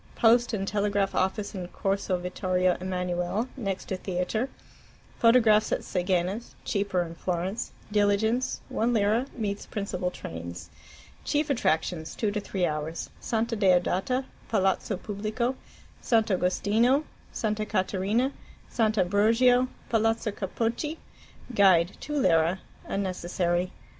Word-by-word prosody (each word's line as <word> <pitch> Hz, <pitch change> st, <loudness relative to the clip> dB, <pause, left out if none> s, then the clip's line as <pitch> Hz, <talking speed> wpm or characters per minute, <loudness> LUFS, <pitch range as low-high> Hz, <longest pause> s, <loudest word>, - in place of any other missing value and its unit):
Post 235 Hz, +1 st, +4 dB
and 195 Hz, -3 st, -2 dB
Telegraph 205 Hz, -1 st, 0 dB
office 200 Hz, +2 st, 0 dB
in 185 Hz, -3 st, -5 dB
Corso 195 Hz, 0 st, -1 dB
Vittorio 180 Hz, 0 st, 0 dB
Emmanuele, 180 Hz, +4 st, -1 dB
next 195 Hz, -8 st, -3 dB
to 190 Hz, -, -3 dB
theatre. 185 Hz, +7 st, -2 dB, 0.7 s
Photographs 225 Hz, -3 st, +5 dB
at -, -, +1 dB
Seghena's 185 Hz, +4 st, -1 dB
(cheaper 200 Hz, -3 st, 0 dB
in 165 Hz, -1 st, -7 dB
Florence). 180 Hz, +5 st, -3 dB, 0.2 s
Diligence 210 Hz, +4 st, +1 dB
(1 235 Hz, +2 st, +1 dB
lira) 220 Hz, +4 st, +2 dB
meets 205 Hz, -3 st, -3 dB
principal 190 Hz, -3 st, -2 dB
trains. 85 Hz, -, -8 dB, 0.5 s
Chief 295 Hz, 0 st, 0 dB
attractions 160 Hz, -, 0 dB
(2 215 Hz, -3 st, 0 dB
3 200 Hz, -3 st, -1 dB
hours): 155 Hz, +1 st, -3 dB
Santa 230 Hz, 0 st, -1 dB
Deodata, 195 Hz, +6 st, +2 dB, 0.2 s
Palazzo 195 Hz, -1 st, +1 dB
Pubblico, 215 Hz, +5 st, -2 dB, 0.5 s
Sant' 225 Hz, -2 st, +2 dB
Agostino, 215 Hz, +9 st, +2 dB, 0.3 s
Santa 215 Hz, -1 st, -1 dB
Caterina, 210 Hz, +5 st, 0 dB, 0.4 s
Sant' 220 Hz, -2 st, +1 dB
Ambrogio, 225 Hz, +7 st, +4 dB, 0.2 s
Palazzo 225 Hz, -1 st, +1 dB
Capocchi. 230 Hz, -, -2 dB, 0.6 s
Guide 185 Hz, -4 st, +5 dB
(2 295 Hz, -, -6 dB
lire) 165 Hz, -4 st, +3 dB, 0.3 s
unnecessary. 180 Hz, -2 st, -1 dB
200 Hz, 110 wpm, -27 LUFS, 180-225 Hz, 0.7 s, Photographs